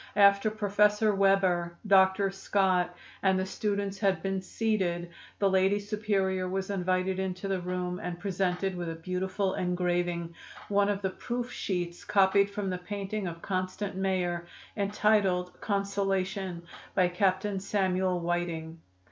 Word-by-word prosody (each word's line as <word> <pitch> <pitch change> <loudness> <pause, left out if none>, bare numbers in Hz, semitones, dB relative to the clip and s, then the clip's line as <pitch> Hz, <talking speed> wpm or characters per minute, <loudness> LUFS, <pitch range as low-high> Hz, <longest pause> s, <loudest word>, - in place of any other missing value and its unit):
After 200 +1 +5
Professor 210 0 +2
Weber, 190 -3 +2
Dr. 195 0 +4
Scott 190 -2 +1 0.3
and 190 -1 +3
the 190 - 0
students 200 0 -2
had 190 -6 +1
been 195 0 -1
seated 185 -5 -1 0.3
the 200 - +2
Lady 190 +1 +3
Superior 200 -3 -1
was 190 +1 -2
invited 185 0 0
into 190 0 -3
the 195 -1 0
room 180 0 -3
and 175 0 -4
presented 190 0 -1
with 175 -1 -3
a 165 - -4
beautiful 185 +3 -2
engraving, 175 -2 -1 0.4
one 200 0 +3
of 200 -1 -1
the 190 - 0
proof 245 +4 -4
sheets 175 -2 -3
copied 200 0 +4
from 200 -1 -3
the 180 - -3
painting 200 +1 -4
of 165 -1 -7
Constant 185 +1 -2
Mayor, 180 -3 -1 0.3
entitled 200 -3 +1
'Consolation,' 195 -3 -1 0.3
by 185 -1 +4
Captain 190 +2 0
Samuel 185 -2 0
Whiting. 170 -1 -2
190 Hz, 135 wpm, -29 LUFS, 180-200 Hz, 0.4 s, After